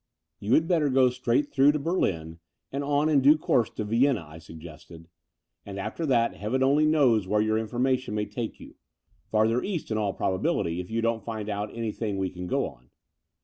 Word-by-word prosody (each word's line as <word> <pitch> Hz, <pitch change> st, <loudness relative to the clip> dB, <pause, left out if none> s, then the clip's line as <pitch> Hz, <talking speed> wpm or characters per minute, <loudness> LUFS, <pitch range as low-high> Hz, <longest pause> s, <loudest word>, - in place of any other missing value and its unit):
"You 105 Hz, +5 st, +2 dB
had 160 Hz, -, +2 dB
better 165 Hz, -5 st, +2 dB
go 130 Hz, -1 st, +4 dB
straight 125 Hz, +3 st, 0 dB
through 140 Hz, +1 st, +4 dB
to -, -, 0 dB
Berlin 85 Hz, -, -2 dB, 0.3 s
and 140 Hz, +1 st, -3 dB
on, 145 Hz, +1 st, +1 dB
in 150 Hz, -3 st, +3 dB
due 145 Hz, +4 st, +6 dB
course, 125 Hz, -6 st, +1 dB
to -, -, -5 dB
Vienna," 115 Hz, -2 st, +1 dB
I 80 Hz, +2 st, -12 dB
suggested, 80 Hz, +1 st, -12 dB, 0.6 s
*'and 100 Hz, -1 st, -8 dB
after 110 Hz, -, -4 dB
that 120 Hz, -3 st, +2 dB
Heaven 125 Hz, +6 st, -1 dB
only 145 Hz, +3 st, +3 dB
knows 125 Hz, -10 st, +3 dB
where 105 Hz, +2 st, +1 dB
your 110 Hz, +1 st, +1 dB
information 125 Hz, +1 st, -1 dB
may 105 Hz, 0 st, -1 dB
take 110 Hz, +3 st, -6 dB
you -, -, -12 dB, 0.3 s
— -, -, -41 dB
^farther 110 Hz, +3 st, +2 dB
East 180 Hz, -, -4 dB
in 110 Hz, -, 0 dB
all 100 Hz, -2 st, -1 dB
probability, 90 Hz, -2 st, -1 dB
if 90 Hz, -, -6 dB
you 115 Hz, +1 st, -1 dB
don't 115 Hz, -2 st, 0 dB
find 110 Hz, -2 st, -5 dB
out 105 Hz, 0 st, -3 dB
anything 110 Hz, -2 st, -3 dB
we 95 Hz, -1 st, -2 dB
can 90 Hz, 0 st, -7 dB
go -, -, 0 dB
upon. 60 Hz, 0 st, -11 dB
115 Hz, 200 wpm, -26 LUFS, 100-135 Hz, 0.6 s, due